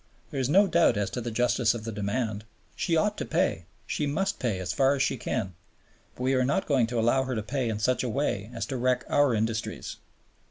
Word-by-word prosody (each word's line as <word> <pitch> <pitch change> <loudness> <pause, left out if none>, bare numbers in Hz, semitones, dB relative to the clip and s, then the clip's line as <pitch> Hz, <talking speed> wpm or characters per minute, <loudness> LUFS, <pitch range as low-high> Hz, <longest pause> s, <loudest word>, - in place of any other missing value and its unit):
There 140 - -3
is 130 0 0
no 195 +7 +6
doubt 170 - +3
as 105 -1 -1
to 125 - -3
the 120 - -3
justice 120 0 +2
of 115 - -6
the 115 - -4
demand. 105 +1 -2 0.3
She 165 -2 +1
ought 210 +5 +1
to - - -1
pay, - - 0 0.2
she 150 - -2
must 195 +7 -1
pay 115 -6 -1
as 95 -1 -3
far 135 +1 +3
as 135 - +1
she - - 0
can, 95 -1 -3 0.6
but 125 - -6
we 130 +1 +2
are 130 -1 +3
not 140 +9 +1
going 130 -6 +2
to 120 0 -2
allow 120 +4 +3
her 130 -1 -2
to 110 - -2
pay 125 +2 -1
in 110 - -2
such 125 +5 +1
a 125 - -1
way 110 -5 -1
as 115 -3 -4
to 130 - -4
wreck 125 0 +1
our 145 -4 +3
industries." 110 +1 -3
125 Hz, 240 wpm, -27 LUFS, 110-140 Hz, 0.6 s, no